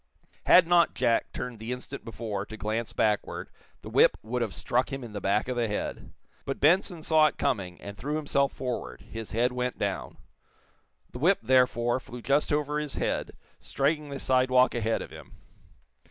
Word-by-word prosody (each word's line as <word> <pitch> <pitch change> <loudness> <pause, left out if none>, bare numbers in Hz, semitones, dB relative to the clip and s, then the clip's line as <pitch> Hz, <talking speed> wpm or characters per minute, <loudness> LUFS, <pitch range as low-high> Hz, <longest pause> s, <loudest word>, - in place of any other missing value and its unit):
Had 180 - +8
not 170 0 +4
Jack 120 -2 +1
turned 125 -3 -6
the 110 +2 -5
instant 125 +2 -6
before, 110 -3 -4
to 110 - -8
glance 110 +2 -2
backward, 105 -2 -1 0.3
the - - -7
whip - - +5
would 120 +3 -2
have 115 -4 -1
struck 120 +10 0
him 135 -1 -4
in 115 -3 -9
the 105 - -5
back 100 +3 +1
of 125 - -2
the 120 -1 0
head. 105 - -4 0.3
But 135 - -4
Benson 175 +1 +3
saw 155 -1 +5
it - - -4
coming, 100 -11 -1
and 100 0 -8
threw 140 +9 -3
himself 140 -2 +1
forward, 120 - -5
his 115 -1 -8
head 120 +3 +2
went 125 0 -2
down. - - -3 0.9
The 125 - -8
whip, 185 +8 +4
therefore, 125 -1 +3
flew 120 -1 -10
just 140 +4 +2
over 150 0 0
his 150 -2 -5
head, - - -2 0.3
striking 150 +2 -1
the 140 -1 -5
sidewalk 130 0 +3
ahead 115 -1 -1
of - - -12
him. - - -12
125 Hz, 185 wpm, -28 LUFS, 115-140 Hz, 0.9 s, Had